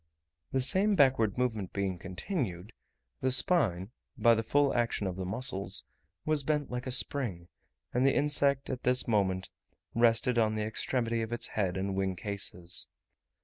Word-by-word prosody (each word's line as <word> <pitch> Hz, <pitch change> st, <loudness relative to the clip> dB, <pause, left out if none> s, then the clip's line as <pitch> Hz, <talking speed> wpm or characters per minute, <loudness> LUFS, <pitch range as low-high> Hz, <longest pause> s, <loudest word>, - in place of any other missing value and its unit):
The 130 Hz, -, +1 dB
same 195 Hz, +10 st, +3 dB
backward 130 Hz, -, +3 dB
movement 110 Hz, -7 st, -2 dB
being 95 Hz, -3 st, -2 dB
continued, 95 Hz, -, -5 dB, 0.5 s
the 130 Hz, -, +1 dB
spine, 115 Hz, -, +3 dB, 0.3 s
by 115 Hz, +1 st, +5 dB
the 115 Hz, -, 0 dB
full 140 Hz, +5 st, +1 dB
action 120 Hz, -3 st, -1 dB
of 95 Hz, -2 st, -3 dB
the 95 Hz, -1 st, -5 dB
muscles, 100 Hz, -1 st, 0 dB, 0.4 s
was 155 Hz, -1 st, +1 dB
bent 150 Hz, -1 st, -2 dB
like 125 Hz, +1 st, -4 dB
a -, -, -3 dB
spring; 120 Hz, -10 st, -1 dB, 0.4 s
and 125 Hz, -, +1 dB
the 135 Hz, 0 st, +3 dB
insect 140 Hz, -2 st, +1 dB
at 130 Hz, -1 st, -5 dB
this 125 Hz, 0 st, +1 dB
moment 95 Hz, -4 st, 0 dB, 0.4 s
rested 120 Hz, +1 st, +3 dB
on 110 Hz, -1 st, +1 dB
the 105 Hz, -, -2 dB
extremity 115 Hz, +1 st, -1 dB
of 110 Hz, 0 st, -5 dB
its 120 Hz, -, -1 dB
head 95 Hz, -4 st, -2 dB
and 95 Hz, +1 st, -2 dB
wing 95 Hz, -1 st, -1 dB
cases. 90 Hz, -2 st, +1 dB
115 Hz, 160 wpm, -30 LUFS, 95-130 Hz, 0.5 s, by